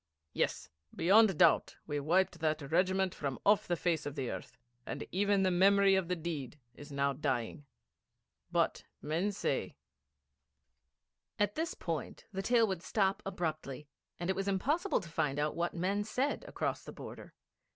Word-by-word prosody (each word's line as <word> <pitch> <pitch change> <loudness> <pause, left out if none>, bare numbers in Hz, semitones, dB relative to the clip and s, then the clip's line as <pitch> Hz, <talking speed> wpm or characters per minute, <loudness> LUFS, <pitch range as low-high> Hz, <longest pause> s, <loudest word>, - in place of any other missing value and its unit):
Yes, - - -1 0.3
beyond 195 +1 +5
doubt - - +4
we 145 -1 -2
wiped 175 +4 +2
that 155 -2 -1
regiment 185 +2 +2
from 140 -3 -3
off 205 0 +4
the 175 - +1
face 165 -3 0
of 145 - -5
the 135 -5 -2
earth, - - -8 0.3
and - - -5
even 200 +1 +2
the 185 - +3
memory 195 +2 +5
of 190 -3 +2
the 180 - 0
deed 155 -5 -5 0.2
is 145 +4 -12
now 140 0 +1
dying. 135 0 -2 0.8
But - - +1 0.2
men 165 +7 -1
say 200 - -2 0.8
' 70 - -53
At 205 0 +2
this 325 +2 -2
point - - -4
the 195 -1 -3
tale 230 +2 +4
would 190 -5 -3
stop 195 0 +1
abruptly, 155 -6 -4 0.3
and 175 - -3
it - - -2
was 195 0 -2
impossible 280 - +1
to 175 - -10
find 150 -4 -1
out 150 +1 0
what 170 0 -1
men 195 +4 0
said 260 +7 -1
across - - -2
the - - -8
border. - - -10
175 Hz, 165 wpm, -33 LUFS, 150-195 Hz, 0.8 s, beyond